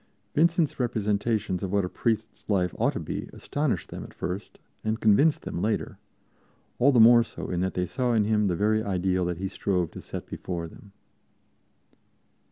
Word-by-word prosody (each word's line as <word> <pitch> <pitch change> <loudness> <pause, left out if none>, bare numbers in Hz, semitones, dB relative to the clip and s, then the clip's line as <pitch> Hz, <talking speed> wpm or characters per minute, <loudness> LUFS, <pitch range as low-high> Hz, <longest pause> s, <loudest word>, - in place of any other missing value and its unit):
Vincent's 165 -1 +2
representations 105 -4 0
of 95 - -3
what 100 -2 +2
a - - -2
priest's 110 +3 -2
life 90 -4 +1
ought - - +2
to - - -3
be - - -5
astonished 145 - -2
them - - -6
at - - -12
first 95 +4 -5 0.3
and 110 +1 -1
convinced 125 +9 +4
them 85 - -4
later 105 +1 -1 0.8
all 140 +4 +5
the 125 - +4
more 120 +1 +8
so 115 - -6
in 90 - -1
that 95 0 -1
they 90 - 0
saw 125 +6 -1
in 110 -2 +3
him 105 0 +2
the 90 - 0
very 110 +3 +2
ideal 95 -2 0
that 90 -1 -2
he 95 +2 -3
strove 90 -4 -1
to - - -9
set - - -7
before 85 -2 -5
them. 100 +5 -15
105 Hz, 180 wpm, -27 LUFS, 90-115 Hz, 0.8 s, more